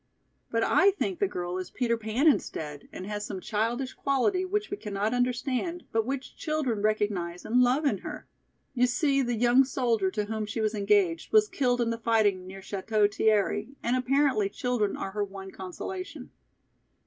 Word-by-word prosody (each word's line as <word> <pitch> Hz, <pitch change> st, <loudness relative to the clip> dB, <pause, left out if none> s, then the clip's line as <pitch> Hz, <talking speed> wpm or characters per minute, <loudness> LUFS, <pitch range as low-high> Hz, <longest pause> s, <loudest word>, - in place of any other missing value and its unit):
But 230 Hz, 0 st, +1 dB
I 385 Hz, +2 st, +5 dB
think 385 Hz, -2 st, -2 dB
the 400 Hz, -, +2 dB
girl 180 Hz, -, -4 dB
is 185 Hz, -, -5 dB
Peter 235 Hz, -2 st, 0 dB
Pan 225 Hz, +6 st, 0 dB
instead 150 Hz, -, 0 dB
and 185 Hz, -, -7 dB
has 205 Hz, 0 st, -4 dB
some 200 Hz, -2 st, -5 dB
childish 235 Hz, +6 st, -2 dB
quality 275 Hz, +8 st, +1 dB
which 410 Hz, +2 st, -2 dB
we 400 Hz, -, -2 dB
cannot 210 Hz, -, -2 dB
understand 255 Hz, +7 st, -1 dB
but 225 Hz, 0 st, 0 dB
which 270 Hz, -1 st, -4 dB
children 295 Hz, -9 st, -1 dB
recognize 205 Hz, -5 st, -1 dB
and 245 Hz, +3 st, +3 dB
love 255 Hz, +5 st, +3 dB
in 280 Hz, -, +1 dB
her. -, -, -8 dB, 0.5 s
You 250 Hz, -1 st, +3 dB
see 275 Hz, +3 st, +2 dB
the 240 Hz, -2 st, 0 dB
young 245 Hz, +3 st, +5 dB
soldier 235 Hz, -7 st, 0 dB
to 210 Hz, +2 st, -2 dB
whom 215 Hz, 0 st, -3 dB
she 220 Hz, +2 st, -4 dB
was 215 Hz, 0 st, +1 dB
engaged 200 Hz, -5 st, +1 dB
was 430 Hz, -1 st, +5 dB
killed 245 Hz, -8 st, +1 dB
in 230 Hz, -1 st, +1 dB
the 230 Hz, -, -3 dB
fighting 210 Hz, -5 st, +2 dB
near 195 Hz, +1 st, -9 dB
Château 205 Hz, +2 st, 0 dB
Thierry 215 Hz, +3 st, +1 dB
and 240 Hz, +2 st, +1 dB
apparently 255 Hz, -5 st, +2 dB
children 235 Hz, -2 st, -1 dB
are 195 Hz, -, -4 dB
her 205 Hz, +1 st, -1 dB
one 195 Hz, -1 st, -8 dB
consolation. 280 Hz, -, -7 dB
230 Hz, 180 wpm, -28 LUFS, 205-265 Hz, 0.5 s, I